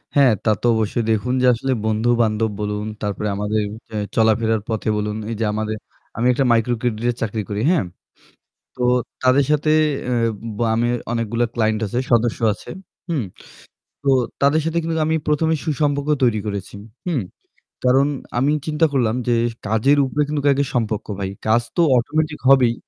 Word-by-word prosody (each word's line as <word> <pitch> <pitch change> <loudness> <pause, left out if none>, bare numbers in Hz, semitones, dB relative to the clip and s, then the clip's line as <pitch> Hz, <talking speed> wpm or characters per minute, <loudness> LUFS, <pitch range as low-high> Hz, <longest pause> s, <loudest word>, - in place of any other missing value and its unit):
হ্যাঁ, 135 -4 +6
তা - - +2
তো - - -3
অবশ্যই 110 +1 0
দেখুন 110 +3 0
যে - - +3
আসলে 135 +3 -2
বন্ধু-বান্ধব 110 0 +1
বলুন 105 0 -2 0.2
তারপরে 105 +1 -2
আমাদের 105 +1 -1 0.3
এ - - -4 0.2
চলাফেরার 110 0 +2
পথে 110 -1 -1
বলুন 105 0 -2
এই 115 - -3
যে 115 - +1
আমাদের 110 0 -2 0.4
আমি 120 +2 +1
একটা 135 +2 +1
মাইক্রোক্রেডিটে 120 0 +1
চাকরি 110 -1 -2
করি, 105 0 -2
হ্যাঁ? 175 -4 +3 0.9
তো 125 - -7 0.4
তাদের 130 +2 +4
সাথে 150 0 +2 0.3
অ্যাঁ 120 -2 +1 0.3
ব - - -9 0.2
আমি 120 +1 +1 0.2
অনেকগুলো 115 0 -1
ক্লায়েন্ট 110 -2 +1
আছে, 120 +5 -2
সদস্য 120 -1 +2
আছে, - - -13 0.4
হুম? 155 -7 0 0.8
তো 140 - +1 0.3
তাদের 140 +3 +4
সাথে 165 +1 -1
কিন্তু 165 0 -2
আমি 160 - +1
প্রথমে 160 +2 +2
সুসম্পর্ক 145 -1 0
তৈরি 115 -4 +3
করেছি, 100 -1 -5 0.3
হুম? 160 -8 0 0.6
কারণ 135 +2 +4 0.3
আমি 140 +4 +2 0.2
চিন্তা 155 +1 +2
করলাম 120 -4 +1
যে 120 - +3 0.3
কাজের 110 +7 +3
উপরে 140 +3 -1
কিন্তু 150 0 -1
আগে 140 +1 +1
সম্পর্ক 110 -3 -1
ভাই। 95 -1 -2 0.2
কাজ 115 +2 +4 0.2
তো - - +5 0.2
automatic 150 +5 -1
হবেই 130 -4 +6
120 Hz, 160 wpm, -21 LUFS, 110-140 Hz, 0.9 s, হ্যাঁ